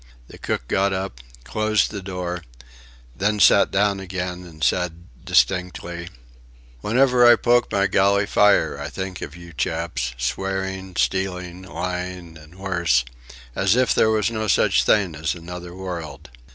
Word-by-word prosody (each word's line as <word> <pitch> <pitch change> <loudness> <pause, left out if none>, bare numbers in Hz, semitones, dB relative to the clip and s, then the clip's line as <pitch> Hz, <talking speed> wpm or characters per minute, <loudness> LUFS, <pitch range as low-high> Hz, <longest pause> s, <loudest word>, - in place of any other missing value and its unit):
The - - -13
cook - - -3
got 100 0 +1
up, 95 -10 -4 0.2
closed 110 - +1
the 100 -2 -5
door, 90 -2 -5 0.7
then 105 +5 0
sat 100 +2 +6
down 100 0 +1
again 90 -1 -5
and 80 -2 -10
said 85 -2 0 0.2
distinctly: 90 -2 0 0.7
"Whenever 125 - +3
I 120 0 +9
poke 120 +1 +2
my 100 0 +2
galley 100 +1 +3
fire 105 0 +3
I - - -5
think 95 -1 -6
of 75 - -7
you 85 -1 -12
chaps - - -2
swearing, 95 +6 -3
stealing, 90 -1 -1
lying, 90 -2 -5
and 80 +2 -15
worse 90 -10 +1 0.5
as 95 +3 +2
if 130 0 +3
there 110 - +3
was 110 +1 +1
no 110 -1 -2
such - - +3
thing 100 -5 +2
as 80 +3 -2
another 90 +1 -8
world.... 90 -8 -7
95 Hz, 145 wpm, -22 LUFS, 85-100 Hz, 0.7 s, I